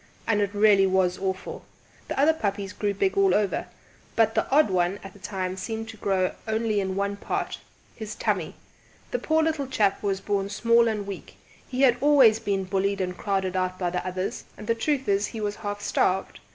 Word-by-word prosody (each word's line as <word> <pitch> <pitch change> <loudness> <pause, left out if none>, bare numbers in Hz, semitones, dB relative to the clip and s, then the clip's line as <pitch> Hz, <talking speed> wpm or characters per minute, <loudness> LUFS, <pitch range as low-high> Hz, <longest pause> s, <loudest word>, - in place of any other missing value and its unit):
And 210 -2 +2
it 205 0 -1
really 205 -2 +5
was 185 -1 +1
awful! 190 -1 -4 0.4
The - - -3
other 300 +3 +5
puppies 200 -7 -3
grew 205 -1 -1
big 380 - +1
all 390 -1 +4
over, 205 -2 0 0.5
but 225 -1 +3
the - - 0
odd 285 -6 +4
one 180 +1 +1
at 195 -1 -9
that 200 - -17
time 185 -2 -3
seemed 225 +3 -5
to 225 - -9
grow 190 -3 +1 0.2
only 220 -1 0
in 190 -1 -2
one 200 +1 -1
part - - -3 0.4
his 220 -2 -6
tummy! - - -1 0.6
The - - -1
poor 315 0 +2
little 315 -4 -1
chap 205 -6 +1
was 195 -2 -1
born 200 0 -1
small 230 +3 +3
and 210 -2 -1
weak; 200 -1 -8 0.3
he 255 0 -3
had 250 -3 +5
always 270 -7 +6
been 200 -3 -1
bullied 195 +1 0
and 180 -1 -2
crowded 190 -1 -1
out 185 0 -1
by 180 -2 -1
the 180 - -2
others, 185 +1 -4
and 210 - -9
the 230 - +2
truth 270 +3 -1
is 200 0 +2
he 225 - -7
was 205 -1 -2
half 205 -1 -5
starved. 190 -1 0
205 Hz, 205 wpm, -26 LUFS, 190-225 Hz, 0.6 s, always